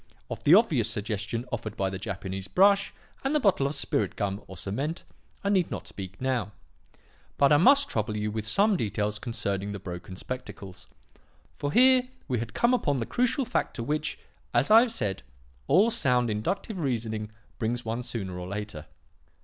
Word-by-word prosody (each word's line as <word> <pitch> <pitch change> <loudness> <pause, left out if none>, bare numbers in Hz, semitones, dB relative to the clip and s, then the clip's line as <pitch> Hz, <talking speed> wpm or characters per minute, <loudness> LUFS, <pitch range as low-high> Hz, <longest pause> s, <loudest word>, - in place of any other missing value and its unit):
Of - - -5
the 155 - +8
obvious 150 - +3
suggestion 105 +2 -3
offered 110 -3 -4
by 95 -1 0
the 95 - -5
Japanese 95 -1 -5
brush 200 - +4 0.3
and 275 +3 0
the - - +4
bottle 190 - +3
of 145 - -3
'spirit 140 0 0
gum' 100 -1 -2
or 95 - -10
cement, 135 - -3 0.4
I 200 - 0
need 190 -4 +2
not - - -5
speak 95 -1 -9
now; 125 -6 -1 0.8
but 140 0 +4
I - - +7
must 275 - +6
trouble 105 -1 -2
you 105 0 -1
with 110 0 -3
some 205 - +4
details 105 - -2
concerning 100 -4 -3
the 100 - -5
broken 90 0 -7
spectacles. 100 -4 -8 0.7
For 145 - -1
here 255 - +5 0.2
we 125 -5 0
had 115 -1 -6
come 235 +1 +3
upon 145 - +1
the 115 - -2
crucial 250 - +1
fact 250 - -1
to 115 - -3
which, 150 +4 -2 0.4
as 120 +10 +3
I 220 - +10
have 245 -1 0
said, 100 - -2 0.5
all 195 +11 +5
sound 125 - +2
inductive 185 - -2
reasoning 110 -7 -2 0.3
brings 120 +2 -2
one 115 +2 -2
sooner 95 -7 -5
or 90 - -6
later. 100 -5 -5
120 Hz, 180 wpm, -27 LUFS, 105-175 Hz, 0.8 s, I